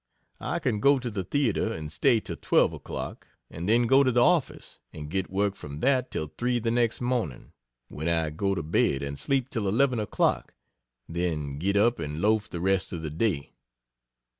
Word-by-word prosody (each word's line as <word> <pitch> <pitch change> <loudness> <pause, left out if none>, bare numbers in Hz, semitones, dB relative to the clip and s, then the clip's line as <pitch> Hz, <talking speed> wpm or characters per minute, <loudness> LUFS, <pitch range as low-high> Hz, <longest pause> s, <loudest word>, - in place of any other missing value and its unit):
I - - -2
can 105 - -1
go 140 +5 +5
to 125 -2 -4
the 100 -3 -3
theatre 115 0 0
and 80 -4 -5
stay 120 - +3
till - - -6
12 - - +2
o'clock - - -6 0.2
and 85 +4 -4
then 120 +2 +4
go 135 +4 +5
to 130 - +2
the 120 0 +4
office, 175 -3 0
and 75 -1 -8
get 95 0 -1
work 100 +1 0
from 75 -6 -8
that 130 -2 +2
till 75 -1 -4
3 120 0 +1
the 115 -1 -1
next 120 0 +1
morning; 120 - -2 0.4
when 80 +3 -4
I 80 -2 +1
go 95 +5 -1
to 85 - -3
bed, 70 -3 +1
and 70 0 -4
sleep 130 - 0
till 110 -3 -2
11 125 +4 +2
o'clock, 105 - 0 0.5
then 80 -5 -3
get 100 +4 +1
up 115 +4 +3
and 75 -1 -4
loaf 105 +2 +1
the 85 - -5
rest 95 +1 +1
of 85 -3 -5
the 75 - -4
day. 80 -4 -1
100 Hz, 195 wpm, -27 LUFS, 80-120 Hz, 0.5 s, go